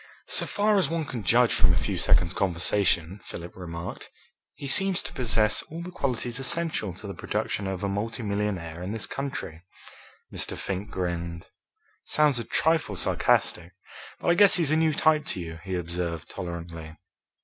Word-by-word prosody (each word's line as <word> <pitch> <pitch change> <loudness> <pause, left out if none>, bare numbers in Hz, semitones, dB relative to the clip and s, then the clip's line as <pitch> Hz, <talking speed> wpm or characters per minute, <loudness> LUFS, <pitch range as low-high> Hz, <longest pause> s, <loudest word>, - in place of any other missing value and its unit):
"So - - +3
far 205 0 +3
as 190 - +1
one 165 -1 -1
can 125 -5 -5
judge 120 +4 +4
from 90 - +4
a - - 0
few 65 - -1
seconds' 85 0 +3
conversation," 90 0 +1
Philip 85 +1 -8
remarked, 85 -1 -7 0.5
"he 140 -1 -7
seems 190 +6 +2
to - - -5
possess 110 -4 +3
all 165 +2 -6
the 180 - -7
qualities 125 -5 -1
essential 160 - 0
to 105 - -8
the 100 - -5
production 100 0 -2
of 95 -1 -3
a - - +1
multimillionaire 100 -5 -2
in 95 +4 -4
this 110 - 0
country." 135 - -5 0.7
Mr. - - -2
Fink 100 +2 -4
grinned. 85 -2 -4 0.5
"Sounds 150 -4 +3
a - - -2
trifle 160 -5 +1
sarcastic, 85 0 +1 0.5
but - - 0
I - - +6
guess 200 +2 +7
he's 165 -5 +2
a - - +4
new 160 -1 +3
type 155 -1 +4
to - - -2
you," 80 -2 -6
he 95 0 -3
observed 85 -1 -3
tolerantly. 85 -2 -7
100 Hz, 170 wpm, -27 LUFS, 85-140 Hz, 0.7 s, guess